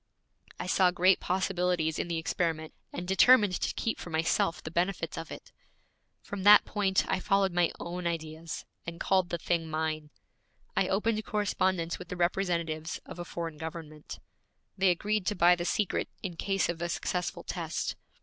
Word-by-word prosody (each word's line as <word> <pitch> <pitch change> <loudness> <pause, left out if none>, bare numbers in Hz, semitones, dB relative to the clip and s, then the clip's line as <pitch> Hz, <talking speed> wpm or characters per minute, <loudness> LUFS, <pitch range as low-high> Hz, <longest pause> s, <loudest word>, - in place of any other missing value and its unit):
I - - -3
saw 180 0 +4
great 180 +1 +4
possibilities 180 -3 0
in - - -1
the 170 -1 -2
experiment 160 -1 -2 0.2
and 175 +1 -5
determined 205 0 +5
to - - 0
keep 225 - -2
for - - -7
myself 165 +1 +1
the 155 - -6
benefits 175 -1 -1
of 165 - -6
it. - - -10 0.7
From 200 -1 -6
that 205 +2 +8
point 195 -3 +1
I 190 - 0
followed 195 0 +2
my 175 -1 +3
own 175 0 -4
ideas, 160 -1 -5 0.2
and 170 0 -6
called 185 -2 +2
the 170 - -1
thing 165 -1 -1
mine. 155 -1 -2 0.7
I - - +2
opened 215 +2 0
correspondence 185 -5 0
with 180 - -9
the 180 - -5
representatives 170 -3 -1
of - - -9
a - - -3
foreign 165 -2 -5
government. 160 -2 -7 0.6
They 190 0 +3
agreed 205 +2 0
to 210 - +1
buy 175 -1 +6
the 175 0 -4
secret 205 +1 0
in 180 -4 -4
case 195 +3 0
of 170 -1 -4
a 170 - -1
successful 180 0 -2
test. 165 -3 -3
175 Hz, 170 wpm, -30 LUFS, 165-190 Hz, 0.7 s, that